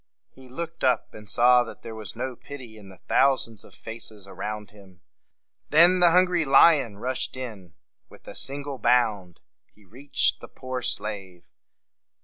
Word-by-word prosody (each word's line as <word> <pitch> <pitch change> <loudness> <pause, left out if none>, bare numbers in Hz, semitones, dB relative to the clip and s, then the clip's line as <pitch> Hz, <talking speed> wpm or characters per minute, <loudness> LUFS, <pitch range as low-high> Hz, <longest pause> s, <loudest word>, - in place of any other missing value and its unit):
He 130 -1 -17
looked 165 +5 -7
up, 125 -1 +1
and 105 -1 -12
saw 125 +1 +5
that 120 - -11
there 115 - -7
was 110 -3 -8
no 125 +2 -4
pity 125 -4 -11
in 105 -3 -14
the 95 - -16
thou 135 0 +4
sands 115 -5 -3
of - - -17
faces 110 -3 -7
around 105 +2 -6
him. 95 -4 -18 0.7
Then 175 +4 +6
the 175 -1 +6
hungry 180 0 +3
lion 135 -5 +5
rushed 130 +3 -3
in. 105 -9 -8 0.3
With - - -18
a - - -8
single 140 -1 -3
bound 105 -7 +1 0.3
he 105 - -24
reached 135 +8 -1
the - - -9
poor 130 -1 -6
slave. 100 -6 -5
120 Hz, 160 wpm, -25 LUFS, 105-135 Hz, 0.7 s, Then